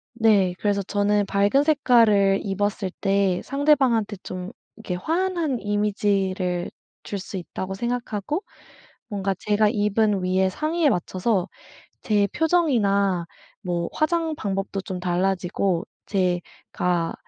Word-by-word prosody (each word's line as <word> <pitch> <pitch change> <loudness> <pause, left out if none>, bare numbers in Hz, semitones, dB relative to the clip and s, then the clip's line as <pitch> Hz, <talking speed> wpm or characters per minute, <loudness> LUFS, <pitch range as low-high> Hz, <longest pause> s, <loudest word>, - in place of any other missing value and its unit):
네. 210 -6 +3
그래서 200 -1 0
저는 205 +1 +1
밝은 200 +8 +2
색깔을 225 -10 +4
입었을 200 -1 -1
때 195 -2 +2
상대방한테 265 -7 +2
좀 185 +2 -6 0.2
이렇게 210 -5 -5
환한 330 - -1
이미지를 195 -3 0 0.3
줄 200 - -5
수 195 - -8
있다고 185 +2 -5
생각하고, 240 - -3 0.7
뭔가 195 -2 -1
제가 210 0 +2
입은 210 -2 +1
위의 185 +1 +2
상의에 310 - +1
맞춰서 185 0 0 0.5
제 205 -2 +2
표정이나 205 - +2 0.4
뭐 175 -2 -2
화장 320 0 0
방법도 195 -2 -3
좀 185 -1 -5
달라지고 180 0 0 0.2
제가 180 -2 -1
200 Hz, 245 characters per minute, -24 LUFS, 190-230 Hz, 0.7 s, 색깔을